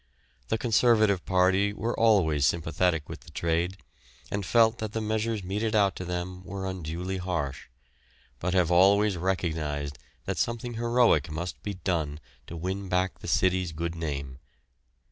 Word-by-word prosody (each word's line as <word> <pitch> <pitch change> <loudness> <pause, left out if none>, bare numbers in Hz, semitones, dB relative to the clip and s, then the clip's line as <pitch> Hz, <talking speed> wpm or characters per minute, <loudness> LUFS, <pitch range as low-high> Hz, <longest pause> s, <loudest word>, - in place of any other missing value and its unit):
The 110 - 0
Conservative 110 -4 +3
party 95 +2 +3
were 115 +3 -2
always 90 -11 +3
sympathetic 80 0 0
with - - -7
the - - -16
"trade," 85 +3 -1 0.5
and 100 0 -1
felt 115 +3 +3
that 110 -1 -4
the 115 - -1
measures 110 -1 -1
meted 105 +4 -1
out 100 -3 +3
to 90 - -5
them 90 +1 -4
were 95 +1 -5
unduly 90 0 -4
harsh, 80 -8 -3 0.7
but 90 +2 -1
have 90 -2 +3
always 100 +3 +5
recognised 80 -6 -2 0.3
that - - -2
something 120 +1 -2
heroic 115 - +3
must 85 +3 -5
be 100 -1 -4
done 80 -5 -2 0.3
to 85 - -7
win 95 +3 -4
back 90 0 0
the - - -9
city's 90 0 +1
good 85 +2 -3
name. 70 -5 -5
90 Hz, 150 wpm, -28 LUFS, 85-105 Hz, 0.7 s, always